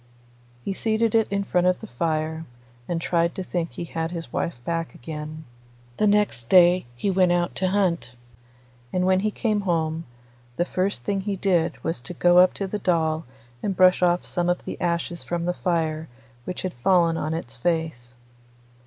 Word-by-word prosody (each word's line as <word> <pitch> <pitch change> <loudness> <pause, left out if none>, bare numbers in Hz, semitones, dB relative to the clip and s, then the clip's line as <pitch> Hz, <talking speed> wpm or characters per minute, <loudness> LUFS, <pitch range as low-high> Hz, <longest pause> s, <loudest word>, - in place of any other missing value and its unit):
He 195 - -1
seated 220 +2 +1
it 225 -1 +4
in 200 0 0
front 180 -2 +1
of 185 - +2
the - - -8
fire, 160 +4 -2 0.4
and 170 -1 -1
tried 170 0 +1
to 190 - -3
think 175 -2 -3
he - - -5
had 165 -1 -3
his 165 -1 -6
wife 170 - -2
back 165 -5 -2
again. 155 +3 -7 0.5
The 210 - +3
next 205 - +1
day 180 -3 +6
he 195 +11 -1
went 185 -1 +3
out 175 0 0
to 190 - +1
hunt, 185 -9 0 0.8
and 180 0 +1
when 185 0 +4
he 215 +2 +1
came 215 -1 0
home 165 -3 -1 0.5
the 175 - +1
first 185 -9 -1
thing 195 +7 -1
he 200 0 -2
did 175 -4 +1
was 165 -6 -2
to 150 +8 -8
go 175 +2 +5
up 180 0 +5
to 200 - -2
the 205 +2 -3
doll 160 -4 +1 0.4
and 195 -3 -2
brush 185 0 +5
off 175 0 +2
some 175 0 -1
of 175 - -1
the - - -6
ashes 170 0 -1
from 170 -1 -2
the 180 - 0
fire 160 -3 -1 0.4
which 180 - -5
had 185 - -2
fallen 170 +6 +3
on 155 0 -2
its 120 -8 -6
face. 125 -4 -2
175 Hz, 190 wpm, -24 LUFS, 160-185 Hz, 0.8 s, day